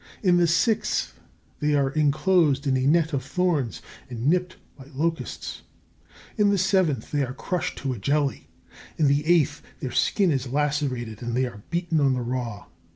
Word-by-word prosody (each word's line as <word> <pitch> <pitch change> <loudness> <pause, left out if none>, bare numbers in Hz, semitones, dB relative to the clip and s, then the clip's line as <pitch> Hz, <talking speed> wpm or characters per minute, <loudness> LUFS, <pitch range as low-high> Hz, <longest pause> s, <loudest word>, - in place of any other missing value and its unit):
In 180 -3 +4
the 175 -1 +4
sixth, 215 +6 +1 0.5
they 150 0 +1
are 135 -2 +2
enclosed 155 0 +2
in 135 -2 +2
a 130 +1 +1
net 160 +1 +3
of 135 -2 -1
thorns 155 -5 -1 0.3
and 120 -1 -5
nipped 180 +4 +1 0.2
by 135 - -13
locusts. 165 +3 -3 0.8
In 205 -1 +5
the 200 - +2
seventh, 185 -6 +1
they 145 -1 +1
are 130 0 -5
crushed 180 -3 -3
to 135 -2 -1
a 120 - -7
jelly. 140 +5 0 0.5
In 155 - +2
the 140 +1 +3
eighth, 150 -4 +3 0.2
their 130 - -4
skin 195 -5 +2
is 135 -2 -1
lacerated 135 -5 -1
and 120 -1 -3
they 130 - +2
are 120 -4 -8
beaten 170 -2 0
on 140 -2 +3
the 125 - -1
raw. 120 -3 -4
145 Hz, 175 wpm, -25 LUFS, 130-170 Hz, 0.8 s, In